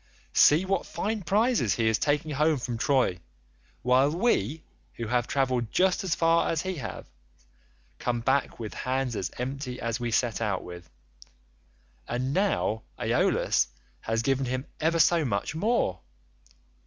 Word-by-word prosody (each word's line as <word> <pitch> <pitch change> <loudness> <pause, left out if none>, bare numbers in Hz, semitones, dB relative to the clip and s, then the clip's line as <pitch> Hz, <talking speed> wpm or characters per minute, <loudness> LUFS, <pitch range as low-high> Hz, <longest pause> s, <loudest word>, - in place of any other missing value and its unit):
See 155 +6 +5
what 195 -1 -1
fine 215 +1 -2
prizes 210 - +2
he 115 -1 +1
is 110 -1 +2
taking 150 +1 0
home 150 +2 +2
from 120 -2 -4
Troy, 125 -10 +2 0.6
while 130 +3 +4
we, 160 - 0 0.3
who 115 - -4
have 125 0 +1
travelled 130 -4 0
just 185 0 +2
as 180 -3 0
far 165 0 +3
as 165 -1 -1
he 185 -2 -3
has, 125 - -6 0.9
come 120 -1 -1
back 135 +2 0
with 110 -2 -5
hands 130 -2 -2
as 95 - -2
empty 130 0 -4
as 115 +1 -2
we 120 -1 -2
set 115 0 0
out 100 -4 -1
with—and 65 - -9
now 190 - +1 0.2
Aeolus 65 - +2 0.3
has 115 +1 -1
given 135 0 +1
him 130 +2 -2
ever 165 +2 +1
so 165 +1 +4
much 105 -3 -2
more. 160 - 0
130 Hz, 145 wpm, -27 LUFS, 110-160 Hz, 0.9 s, See